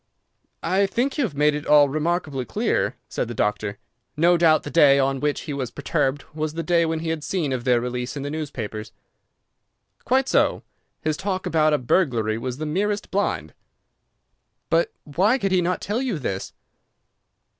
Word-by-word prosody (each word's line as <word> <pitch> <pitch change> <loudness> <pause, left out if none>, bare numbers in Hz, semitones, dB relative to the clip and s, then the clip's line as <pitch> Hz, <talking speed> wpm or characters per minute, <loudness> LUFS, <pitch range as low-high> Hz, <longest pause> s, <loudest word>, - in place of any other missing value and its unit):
"I 195 +2 +2
think 255 +8 -1
you - - +3
have 170 -10 -6
made 150 +1 +3
it 150 0 -5
all 150 -1 +7
remarkably 155 -2 -1
clear," 120 - 0
said - - -3
the 120 - -6
doctor. 105 -1 -1 0.4
"No 170 +3 +5
doubt 165 -2 +4
the - - -6
day 145 -4 +6
on 135 0 +1
which 150 +1 -1
he 150 - -5
was 135 -3 -3
perturbed 140 +1 -1
was 155 0 -3
the 165 - -2
day 170 +1 +2
when 160 0 -2
he 165 - -3
had 160 -2 -2
seen 155 -4 -1
of 125 -1 -3
their 125 -2 +4
release 125 +2 -4
in 140 - -4
the 145 - -4
newspapers." 115 -8 -5 1.1
"Quite 265 +1 +2
so. - - +2 0.4
His 155 -1 0
talk 190 -1 -3
about 155 -1 +3
a 150 - +3
burglary 120 -6 +1
was 125 +1 -4
the 155 - -4
merest 205 +6 -1
blind." 80 - -1 1.2
"But 165 +1 +3
why 190 - +2
could 195 -6 -1
he 185 -1 +3
not 180 +1 -1
tell 215 +5 -1
you 250 -9 -1
this?" 95 -9 -4
150 Hz, 180 wpm, -23 LUFS, 130-175 Hz, 1.2 s, all